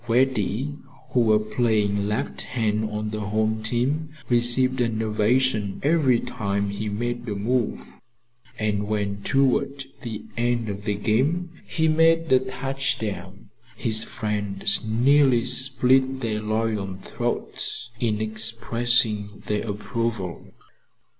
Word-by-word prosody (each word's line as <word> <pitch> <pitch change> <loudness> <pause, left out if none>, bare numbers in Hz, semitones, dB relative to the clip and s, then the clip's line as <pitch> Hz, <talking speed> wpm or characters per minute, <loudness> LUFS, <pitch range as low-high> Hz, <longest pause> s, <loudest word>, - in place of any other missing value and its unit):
Reddy, 130 +3 0 0.3
who 125 - +2
was 110 -2 +2
playing 105 -4 +1
left 70 - -3
end 110 -1 0
on 105 0 -4
the 110 - -4
home 110 +1 -1
team, 125 +8 -1 0.2
received 125 +2 +4
an 115 -2 0
ovation 110 -1 +1
every 145 -5 +3
time 100 -3 -2
he 105 +1 -4
made 120 +3 -3
a 105 - -2
move, 115 +4 -1 0.7
and 105 -1 -1
when 100 -1 -2
towards 135 +2 +1 0.2
the 110 -5 -6
end 120 -1 0
of 100 0 -6
the 105 -1 0
game 135 - 0 0.2
he 160 -1 0
made 165 0 +3
a 130 - +7
touchdown, 130 -8 -4 0.2
his 110 -1 +3
friends 105 -2 +1
nearly 125 +2 +3
split 130 +1 +3
their 110 -3 -1
loyal 110 -3 -2
throats 120 +5 -4
in 110 -3 0
expressing 110 -1 +1
their 105 +1 -2
approval. 105 -2 -4
115 Hz, 120 wpm, -24 LUFS, 105-130 Hz, 0.7 s, a